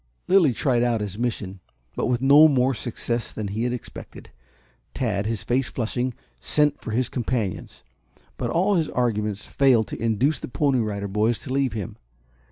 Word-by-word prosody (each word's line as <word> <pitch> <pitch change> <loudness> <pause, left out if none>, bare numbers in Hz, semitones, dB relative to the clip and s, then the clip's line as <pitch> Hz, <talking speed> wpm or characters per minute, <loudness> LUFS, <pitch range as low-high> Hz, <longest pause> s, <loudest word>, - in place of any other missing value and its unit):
Lilly 180 -7 +5
tried 120 0 +1
out 120 -2 +1
his 105 0 -5
mission, 105 -6 -3 0.4
but - - -1
with 125 0 0
no 145 +3 +8
more 135 -2 +2
success 120 0 -3
than 105 -2 -5
he 110 +4 -2
had 125 - 0
expected. 125 -2 -9 0.6
Tad, 105 -5 -1
his 115 -2 -2
face 125 +1 0
flushing, 120 +1 -2 0.2
sent 150 -1 +1
for - - -7
his 120 +3 0
companions. 120 -6 -3 0.5
But - - -3
all 190 +5 +2
his 160 -2 0
arguments 105 -4 -1
failed 130 -5 +3
to - - -6
induce 115 +7 +1
the - - -6
Pony 135 0 +1
Rider 100 -3 -2
Boys 105 +4 +1
to 130 - -5
leave 135 -2 +1
him. 105 -5 -5
120 Hz, 175 wpm, -24 LUFS, 110-135 Hz, 0.6 s, no